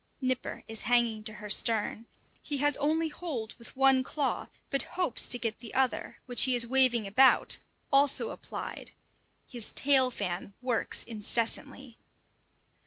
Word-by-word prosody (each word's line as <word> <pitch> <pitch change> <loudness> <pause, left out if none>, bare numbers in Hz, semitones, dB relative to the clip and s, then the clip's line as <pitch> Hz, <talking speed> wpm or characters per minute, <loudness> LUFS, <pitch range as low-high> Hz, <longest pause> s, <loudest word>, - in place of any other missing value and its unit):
Nipper 255 -2 -3
is 225 0 -1
hanging 235 -3 +2
to 215 - -4
her 210 0 -9
stern. 225 0 +2 0.3
He 290 - -3
has 290 +1 +2
only 315 +3 0
hold 290 -9 -5
with 235 - -9
one 270 -1 +4
claw, 275 +1 -3 0.2
but 275 - +1 0.2
hopes 355 -10 +2
to 245 - +4
get 225 -3 -4
the 235 -2 -10
other, 260 -1 -1
which 245 -1 +4
he 260 -1 +2
is 240 -1 +4
waving 245 -3 +4
about, 255 +7 +4 0.3
also 275 0 +4
applied. - - -8 0.5
His 240 -4 -4
tail 265 -2 +4
fan 195 -3 -5
works 250 -2 -1
incessantly. 235 +3 -5
250 Hz, 145 wpm, -28 LUFS, 225-270 Hz, 0.5 s, one